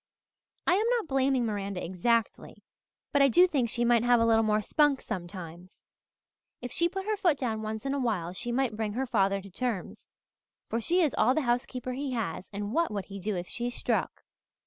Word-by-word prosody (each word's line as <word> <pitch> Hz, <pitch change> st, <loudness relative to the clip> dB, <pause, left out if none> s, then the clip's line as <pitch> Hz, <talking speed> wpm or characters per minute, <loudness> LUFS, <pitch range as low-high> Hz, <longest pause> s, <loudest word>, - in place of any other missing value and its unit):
I -, -, +4 dB
am 420 Hz, +5 st, +2 dB
not 445 Hz, -, -4 dB
blaming 265 Hz, -3 st, +2 dB
Miranda 200 Hz, -3 st, -3 dB
exactly, 215 Hz, +6 st, -1 dB, 0.5 s
but 285 Hz, -, +4 dB
I 275 Hz, -, +7 dB
do 350 Hz, +8 st, +6 dB
think 275 Hz, -10 st, 0 dB
she 240 Hz, +1 st, 0 dB
might 235 Hz, -1 st, +4 dB
have 245 Hz, 0 st, +4 dB
a 230 Hz, -, +3 dB
little 225 Hz, -1 st, +4 dB
more 215 Hz, -1 st, +2 dB
spunk 295 Hz, +3 st, +3 dB
sometimes. 180 Hz, -3 st, -8 dB, 0.7 s
If 245 Hz, 0 st, -6 dB
she 340 Hz, 0 st, +1 dB
put 385 Hz, +2 st, -5 dB
her 430 Hz, 0 st, 0 dB
foot 350 Hz, -7 st, +2 dB
down 225 Hz, -5 st, -2 dB
once 220 Hz, +1 st, -5 dB
in 275 Hz, -, 0 dB
a 280 Hz, -, -1 dB
while 195 Hz, -9 st, -1 dB
she 240 Hz, +6 st, -4 dB
might 245 Hz, -2 st, 0 dB
bring 215 Hz, -1 st, -2 dB
her 260 Hz, +4 st, -1 dB
father 195 Hz, -5 st, +1 dB
to 195 Hz, -, -12 dB
terms, 225 Hz, -2 st, -4 dB, 0.6 s
for 230 Hz, -, -2 dB
she 355 Hz, +9 st, +3 dB
is 300 Hz, -, +1 dB
all 255 Hz, +4 st, +3 dB
the 315 Hz, -, +2 dB
housekeeper 250 Hz, 0 st, -2 dB
he 270 Hz, 0 st, -3 dB
has 195 Hz, -6 st, -3 dB
and 205 Hz, +1 st, -4 dB
what 335 Hz, +2 st, +2 dB
would 200 Hz, -3 st, -4 dB
he 200 Hz, 0 st, -8 dB
do 205 Hz, +2 st, -2 dB
if 175 Hz, 0 st, -4 dB
she 240 Hz, 0 st, -3 dB
'struck'? 245 Hz, -, -1 dB
235 Hz, 210 wpm, -29 LUFS, 205-270 Hz, 0.7 s, I